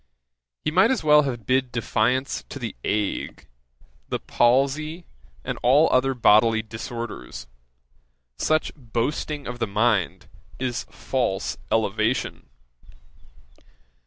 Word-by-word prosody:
He 155 Hz, -, +1 dB
might 185 Hz, +7 st, +5 dB
as 260 Hz, -9 st, 0 dB
well 150 Hz, -1 st, +6 dB
have 120 Hz, -4 st, -6 dB
bid 130 Hz, +1 st, +1 dB
defiance 125 Hz, +3 st, 0 dB
to -, -, -7 dB
the -, -, -5 dB
ague, 105 Hz, -1 st, -2 dB, 0.6 s
the -, -, -1 dB
palsy, 140 Hz, +7 st, +1 dB, 0.4 s
and -, -, -4 dB
all 140 Hz, +6 st, +5 dB
other 130 Hz, +1 st, +2 dB
bodily 110 Hz, -1 st, +4 dB
disorders, 115 Hz, -, -7 dB, 0.9 s
Such 155 Hz, 0 st, +1 dB
boasting 140 Hz, +3 st, -3 dB
of 125 Hz, 0 st, -6 dB
the 115 Hz, -, 0 dB
mind 105 Hz, -2 st, +1 dB, 0.3 s
is 125 Hz, -1 st, -3 dB
false 120 Hz, -7 st, -2 dB
elevation. 110 Hz, +2 st, 0 dB
125 Hz, 105 wpm, -24 LUFS, 115-140 Hz, 0.9 s, well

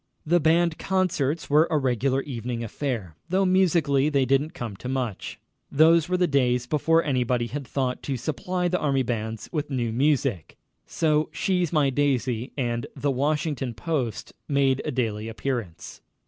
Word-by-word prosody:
The 175 Hz, +3 st, +3 dB
band 165 Hz, +1 st, +2 dB
concerts 175 Hz, -5 st, 0 dB
were 150 Hz, +3 st, +4 dB
a 160 Hz, -, +2 dB
regular 130 Hz, 0 st, 0 dB
evening 120 Hz, -3 st, -4 dB
affair, 115 Hz, -, -4 dB, 0.2 s
though 190 Hz, +2 st, +2 dB
musically 165 Hz, -7 st, +3 dB
they 140 Hz, -3 st, +2 dB
didn't 140 Hz, +6 st, +1 dB
come 115 Hz, -, -5 dB
to 125 Hz, -, -6 dB
much. 125 Hz, -6 st, -3 dB, 0.3 s
Those 160 Hz, +2 st, +5 dB
were 180 Hz, -, +1 dB
the 180 Hz, -, +3 dB
days 125 Hz, -5 st, +1 dB
before 160 Hz, +4 st, +2 dB
anybody 125 Hz, -3 st, 0 dB
had 135 Hz, +2 st, -6 dB
thought 130 Hz, -2 st, -2 dB
to 135 Hz, -2 st, -3 dB
supply 170 Hz, +8 st, -2 dB
the 180 Hz, +1 st, 0 dB
army 135 Hz, -3 st, +1 dB
bands 110 Hz, -2 st, -4 dB
with 150 Hz, -4 st, -2 dB
new 120 Hz, -5 st, -1 dB
music, 130 Hz, -, 0 dB, 0.3 s
so 155 Hz, -1 st, +1 dB
"She's 180 Hz, +1 st, 0 dB
My 150 Hz, -4 st, +2 dB
Daisy" 130 Hz, -3 st, 0 dB
and 120 Hz, -3 st, -2 dB
"The 145 Hz, -, 0 dB
Washington 140 Hz, -2 st, -1 dB
Post" 135 Hz, -, -3 dB, 0.2 s
made 140 Hz, -2 st, +2 dB
a -, -, -1 dB
daily 110 Hz, -4 st, -2 dB
appearance. 115 Hz, -6 st, -5 dB
140 Hz, 160 wpm, -25 LUFS, 125-155 Hz, 0.3 s, Those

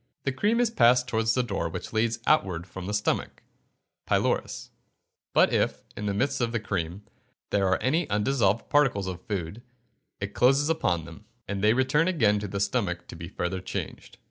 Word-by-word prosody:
The 135 Hz, -, 0 dB
cream 210 Hz, -, +1 dB
is 240 Hz, -2 st, +2 dB
passed 125 Hz, -, +4 dB
towards 110 Hz, -1 st, +1 dB
the 125 Hz, -, +2 dB
door 95 Hz, -8 st, -2 dB
which 80 Hz, -, -7 dB
leads 110 Hz, +1 st, +1 dB
outward 95 Hz, -, +2 dB
from 95 Hz, 0 st, -8 dB
the 105 Hz, -, -3 dB
stomach 105 Hz, -, -2 dB, 0.6 s
(pylorus); -, -, 0 dB, 0.6 s
but -, -, +4 dB
if, -, -, 0 dB
in 105 Hz, -, -4 dB
the 100 Hz, -, 0 dB
midst 130 Hz, +5 st, 0 dB
of 115 Hz, -1 st, 0 dB
the 115 Hz, -, -1 dB
cream, 95 Hz, -2 st, -3 dB, 0.5 s
there 100 Hz, -1 st, +2 dB
are 95 Hz, -, +3 dB
any 155 Hz, +6 st, +1 dB
undissolved 105 Hz, 0 st, +1 dB
particles 135 Hz, -10 st, +2 dB
of 90 Hz, -1 st, -5 dB
food, 100 Hz, 0 st, -4 dB, 0.6 s
it 100 Hz, 0 st, -5 dB
closes 135 Hz, +4 st, +3 dB
upon 90 Hz, -, 0 dB
them, 85 Hz, +6 st, -12 dB, 0.2 s
and 100 Hz, 0 st, -3 dB
they 105 Hz, +1 st, +5 dB
return 130 Hz, +6 st, +2 dB
again 110 Hz, -, +3 dB
to 105 Hz, -, -4 dB
the 100 Hz, +1 st, -4 dB
stomach 100 Hz, -4 st, -1 dB
to -, -, -8 dB
be 85 Hz, 0 st, -7 dB
further 95 Hz, 0 st, -3 dB
changed. 95 Hz, -, -6 dB
105 Hz, 185 wpm, -27 LUFS, 95-130 Hz, 0.6 s, they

